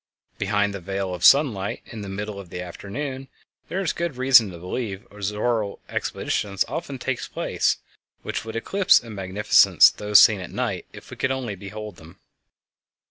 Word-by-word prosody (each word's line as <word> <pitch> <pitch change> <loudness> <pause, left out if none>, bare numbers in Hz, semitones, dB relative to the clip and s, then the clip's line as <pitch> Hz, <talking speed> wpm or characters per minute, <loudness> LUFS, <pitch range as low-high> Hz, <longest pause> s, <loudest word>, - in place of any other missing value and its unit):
Behind 100 0 0
the 100 - -5
veil 95 +1 -3
of 90 - -6
sunlight 115 -9 +4
in 110 - -9
the 100 - -7
middle 105 +1 -5
of 95 -3 -11
the 90 - -6
afternoon, 130 +10 -6 0.4
there 190 - -2
is 180 - -1
good 170 -6 -3
reason 130 -4 +6
to 90 - -9
believe, 95 +4 -5
auroral 105 +1 -2
exhibitions 100 -2 -2
often 140 -4 -5
take 130 0 -3
place - - 0 0.5
which - - -4
would 110 0 -8
eclipse 195 +12 +3
in 115 -2 -10
magnificence 95 +1 +5
those 105 -1 +4
seen 105 -3 +6
at 90 - -7
night - - -3
if - - -13
we - - -9
could 130 - 0 0.3
behold 105 0 -8
them. 80 +1 -15
105 Hz, 165 wpm, -24 LUFS, 95-125 Hz, 0.5 s, reason